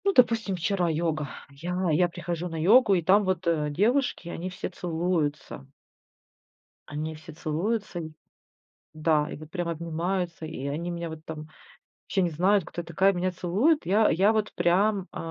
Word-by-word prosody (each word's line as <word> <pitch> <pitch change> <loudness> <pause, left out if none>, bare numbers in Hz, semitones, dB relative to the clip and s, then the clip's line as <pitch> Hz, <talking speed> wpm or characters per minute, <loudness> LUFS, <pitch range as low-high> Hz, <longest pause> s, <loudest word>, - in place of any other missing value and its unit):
Ну, 395 - +3
допустим, 225 - +3
вчера 180 0 0
йога. 155 -3 -1 0.2
Я 175 +5 -2
я 175 +4 +4
прихожу 175 0 -4
на 165 - -5
йогу, 205 +4 +6
и 175 - +2
там 195 +5 +5
вот, 185 -2 -1
э, 155 -3 +1
девушки, 210 - +1
они 175 +2 -4
все 185 - -5
целуются. 160 -5 -2 1.2
Они 155 +2 -4
все 160 +1 -11
целуются, 175 +5 -2
и 160 -1 -6 0.8
да, 155 0 +1
и - - -6
вот 155 +1 -11
прям 175 -1 -3
обнимаются, 170 +1 -2
и 150 -4 -5
они 160 +5 -3
меня 170 -1 -4
вот 160 -1 -9
там 155 -1 -7 0.6
вообще 195 - 0
не 175 - +1
знают, 185 +4 +2
кто 175 - -5
я - - -14
такая, 195 +3 +3
меня 185 +1 0
целуют. 200 - +1
Я 210 +4 +4
я 195 +6 +4
вот 215 -1 -1
прям, 195 +2 +2
э, - - -6
175 Hz, 175 wpm, -27 LUFS, 160-195 Hz, 1.2 s, йогу